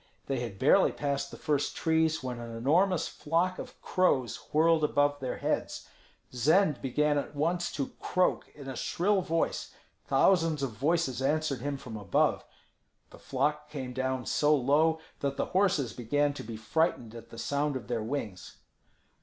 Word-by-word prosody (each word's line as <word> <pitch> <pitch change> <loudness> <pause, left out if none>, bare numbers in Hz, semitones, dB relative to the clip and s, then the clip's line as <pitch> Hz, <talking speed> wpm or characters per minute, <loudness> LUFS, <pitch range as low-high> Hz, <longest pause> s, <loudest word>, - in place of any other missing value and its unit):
They 135 -2 -2
had 115 -5 -5
barely - - +4
passed 140 -1 -2
the - - -10
first 145 -2 -1
trees 160 -1 +1
when 125 -2 -4
an 115 -1 -7
enormous 165 +9 +2
flock 170 +4 -1
of - - -9
crows 135 - +1 0.2
whirled 160 +1 +4
above 145 -1 +2
their 130 -2 -3
heads. - - -2 0.5
Zend 150 - +3
began 145 +3 +1
at 145 - -6
once 170 +4 0
to 140 - -3
croak 180 0 0
in 140 -2 -10
a 135 - -5
shrill 195 +8 +1
voice; 165 -2 -2 0.3
thousands 165 -6 +3
of 135 - -1
voices 135 +2 0
answered 150 -2 0
him 140 +1 -2
from 120 -5 -8
above. 100 -3 +1 0.7
The - - -14
flock 150 0 -1
came 130 -4 -5
down 130 -1 -2
so 150 +1 +3
low 150 +4 +3 0.2
that 140 -1 -2
the - - 0
horses 180 - +2
began 145 +5 0
to - - -7
be 110 0 -7
frightened 120 -1 0
at 115 0 -11
the 115 - -11
sound 145 +4 -1
of 130 - -5
their 120 -2 -1
wings. 110 -6 -5
145 Hz, 165 wpm, -29 LUFS, 125-160 Hz, 0.7 s, barely